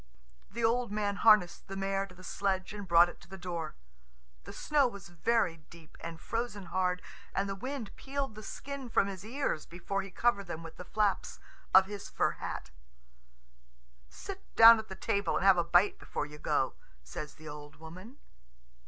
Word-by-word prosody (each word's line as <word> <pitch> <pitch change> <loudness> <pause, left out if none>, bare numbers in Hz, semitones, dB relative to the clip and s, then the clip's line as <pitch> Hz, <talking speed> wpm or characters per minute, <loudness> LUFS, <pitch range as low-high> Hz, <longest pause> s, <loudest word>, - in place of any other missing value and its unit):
The 235 +2 -4
old 235 0 +2
man 205 -1 -1
harnessed 210 -6 +5
the 195 - -6
mare 195 0 -1
to 180 - -15
the 185 - -14
sledge 190 +1 -1
and 205 -2 -7
brought 170 0 +7
it 175 - -11
to - - -15
the 190 - -8
door. 170 -4 -4 0.7
The - - -8
snow 290 -3 +2
was 200 -7 -9
very 175 0 +1
deep 165 -2 -15
and 165 -1 -7
frozen 225 -4 -3
hard, 180 -1 +1 0.3
and 195 - +1
the 195 - -2
wind 250 +1 -5
peeled 275 -2 -3
the 215 - -9
skin 275 +3 -6
from 210 - +3
his 195 -2 -6
ears 235 - -2
before 185 +3 -3
he 195 - -8
covered 200 0 +1
them 165 -1 -5
with 165 - -10
the 180 - -8
flaps 210 +1 0 0.3
of 190 0 +8
his 200 0 -7
fur - - +1
hat. - - -6 1.4
"Sit 390 -1 -8
down 230 0 +10
at 220 - -7
the 190 - -7
table 200 -2 0
and - - 0
have 190 -2 +7
a - - +3
bite 175 +4 +3
before - - -3
you 150 0 -11
go," - - +1 0.3
says 70 - -7
the 155 0 -12
old 150 0 -9
woman. 180 - -11
195 Hz, 190 wpm, -31 LUFS, 175-225 Hz, 1.4 s, down